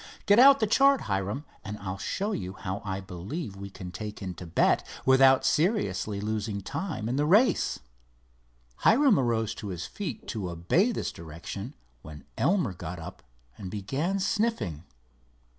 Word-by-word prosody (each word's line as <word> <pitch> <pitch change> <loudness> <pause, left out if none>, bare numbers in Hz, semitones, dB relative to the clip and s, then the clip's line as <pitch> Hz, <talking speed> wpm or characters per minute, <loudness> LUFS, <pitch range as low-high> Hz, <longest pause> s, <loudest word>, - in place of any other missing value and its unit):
"Get 205 +2 +6
out 275 +2 +8
the 220 - +3
chart, 275 +5 +4
Hiram, 100 +8 -2 0.2
and 105 0 -6
I'll 95 -2 -5
show 205 +3 -2
you 95 - -4
how 95 +2 -5
I 95 -1 -3
believe 100 - -6
we 100 0 -7
can 90 -2 -8
take 105 +3 -6
in 95 -3 -5
Thibet 85 -1 +1 0.2
without 130 0 +6
seriously 160 - +1
losing 105 -1 -2
time 145 - -4
in 125 +3 -1
the 145 - +2
race." 215 +9 +3 1.0
Hiram 265 - +5
arose 115 -4 0
to 105 - -8
his 90 -2 -4
feet 170 - -6
to 100 -6 -3
obey 90 - +2
this - - -3
direction, 85 - -8 0.3
when 75 0 -11
Elmer 175 - +1
got 90 0 -7
up 80 - -9 0.4
and 95 - -6
began 135 - -2
sniffing. 195 - -1
110 Hz, 155 wpm, -28 LUFS, -, 1.0 s, out